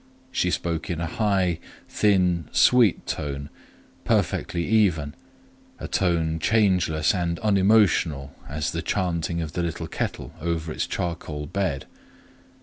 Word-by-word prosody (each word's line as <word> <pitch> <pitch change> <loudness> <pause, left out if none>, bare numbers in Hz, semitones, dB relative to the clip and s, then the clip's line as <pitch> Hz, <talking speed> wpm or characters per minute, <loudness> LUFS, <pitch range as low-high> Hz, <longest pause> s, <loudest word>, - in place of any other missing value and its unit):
She - - +1
spoke 85 -2 -2
in 85 -2 -2
a 85 - -1
high 95 -2 0 0.3
thin 90 -5 +2
sweet 120 -6 +4
tone, 70 0 -4 0.5
perfectly 85 -1 0
even,—a 90 -10 -2
tone 80 -3 +1
changeless 90 -6 +2
and 85 -3 -1
unemotional 95 -9 +3 0.2
as 75 +1 -2
the - - -3
chanting 85 -2 -1
of 80 - -6
the 90 - -1
little 85 -2 -3
kettle - - -4
over 85 -1 -2
its - - -2
charcoal 80 -4 -4
bed. 90 -4 -2
85 Hz, 120 wpm, -25 LUFS, 80-95 Hz, 0.5 s, sweet